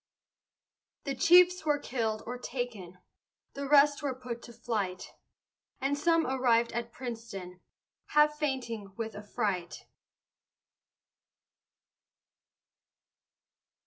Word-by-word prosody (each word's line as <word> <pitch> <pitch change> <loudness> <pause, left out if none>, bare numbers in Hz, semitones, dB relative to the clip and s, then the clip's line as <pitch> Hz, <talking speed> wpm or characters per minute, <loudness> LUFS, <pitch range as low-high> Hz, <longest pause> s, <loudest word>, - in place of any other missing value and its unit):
The 275 - -2
chiefs 360 +3 +6
were 300 -1 +2
kill'd 225 -6 -2
or 245 +1 -5
taken, 235 -9 -5 0.6
The 280 0 -5
rest 290 0 +5
were 280 -3 -2
put 245 -2 -6
to 240 - -11
flight, 215 -6 -3 0.7
And 275 +2 0
some 330 +2 +2
arrived 245 -3 +2
at 235 0 -4
Princeton, 225 -8 -7 0.5
Half 300 0 +3
fainting 240 -9 -3
with 225 -1 -4
affright. 205 -4 -3
245 Hz, 90 wpm, -30 LUFS, 220-285 Hz, 0.7 s, chiefs